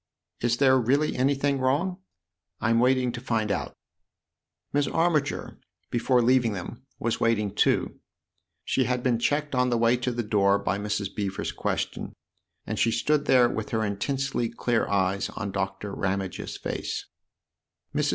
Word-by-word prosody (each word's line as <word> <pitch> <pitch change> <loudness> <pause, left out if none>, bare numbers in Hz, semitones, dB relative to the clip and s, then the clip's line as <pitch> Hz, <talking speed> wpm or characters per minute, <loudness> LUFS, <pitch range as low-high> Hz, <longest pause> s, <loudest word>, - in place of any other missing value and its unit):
" - - -39
Is 120 0 +1
there 130 -1 +5
really 140 +6 +1
anything 140 +1 +1
wrong? 155 +9 0 0.2
" 85 +2 -62
" 75 - -58
I'm 115 0 +2
waiting 125 0 +3
to 120 0 -7
find 110 -4 0
out." - - -3 1.0
Miss 145 -1 +2
Armiger, 165 -4 0 0.3
before 125 +1 +2
leaving 120 -2 +3
them, 100 +6 -7 0.2
was 115 - -1
waiting 105 -3 +1
too. - - +1 0.7
She 130 - +1
had 125 +1 -1
been 120 -3 +2
checked 145 +4 0
on 125 0 +2
the 120 - +1
way 115 +1 +4
to 125 +1 -1
the 120 0 -2
door 100 -2 +3
by 100 0 -1
Mrs. 105 -1 -2
Beever's 100 -2 -3
question, - - -3 0.5
and - - -3
she 115 - +3
stood 145 +6 +1
there 125 -3 +5
with 110 -3 -4
her 110 -1 0
intensely 120 +4 -1
clear 120 0 0
eyes 100 0 0
on 105 -3 -3
Doctor 95 +1 -3
Ramage's 95 -1 -3
face. - - -4
120 Hz, 160 wpm, -26 LUFS, 105-130 Hz, 1.0 s, there